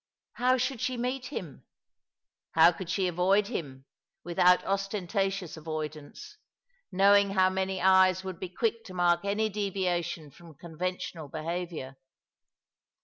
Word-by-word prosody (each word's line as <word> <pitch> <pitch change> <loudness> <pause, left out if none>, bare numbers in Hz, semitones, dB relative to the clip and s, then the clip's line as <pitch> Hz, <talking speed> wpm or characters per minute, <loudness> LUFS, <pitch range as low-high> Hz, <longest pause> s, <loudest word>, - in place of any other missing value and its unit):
How 255 +1 +2
should 255 -1 -2
she 255 -1 -1
meet 250 +1 -3
him? 175 - -7 0.9
How 165 +2 +7
could 175 0 -8
she 185 +1 0
avoid 190 +4 +2
him, 135 - -6 0.4
without 175 +1 +3
ostentatious 195 -2 -2
avoid 155 -1 -4
ance, 155 - -12 0.5
knowing 200 +1 +5
how 185 -1 +3
many 190 0 -2
eyes 190 0 +4
would 190 -2 -6
be 185 - -5
quick 225 +4 -1
to 185 - -10
mark 175 0 +2
any 205 +2 0
deviation 185 -6 -2
from 165 +1 -15
conventional 175 +1 -5
behaviour? 160 -3 -5
185 Hz, 130 wpm, -29 LUFS, 170-200 Hz, 0.9 s, How